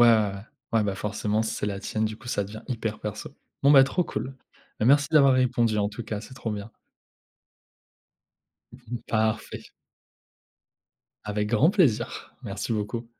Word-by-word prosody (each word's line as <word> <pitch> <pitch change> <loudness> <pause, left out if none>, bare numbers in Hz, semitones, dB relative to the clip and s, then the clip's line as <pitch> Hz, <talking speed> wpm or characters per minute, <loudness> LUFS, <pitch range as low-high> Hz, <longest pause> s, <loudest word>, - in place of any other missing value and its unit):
ouais. 110 -3 +4 0.4
Ouais, 115 -1 +3
bah, 100 -2 -1
forcément, 105 +2 -1
c'est 110 - -2
la 100 -1 -2
tienne, 110 +1 -2
du 110 0 -3
coup, 120 - -12
ça 100 - 0
devient 105 +2 -9
hyper 110 -4 -3
perso. 105 +4 -5 0.3
Bon, 140 - +6
bah, 135 -2 +9
trop 175 +5 0
cool. 130 +3 -5 0.4
Bah, 110 - +2
merci 145 +2 +5
d'avoir 140 -4 +6
répondu 120 -4 +2
en 100 - +1
tout 105 +3 -7
cas, 105 -1 -4
c'est 130 - -11
trop 115 -4 -4
bien. 105 +1 -5 2.0
Mmh 125 - -14
mh. 120 - -5
Parfait. 110 -1 -1 1.6
Avec 105 0 -1
grand 130 - +4
plaisir, 170 - +1
merci 100 +4 -5
beaucoup. 115 +2 -3
110 Hz, 160 wpm, -26 LUFS, 105-130 Hz, 2.0 s, bah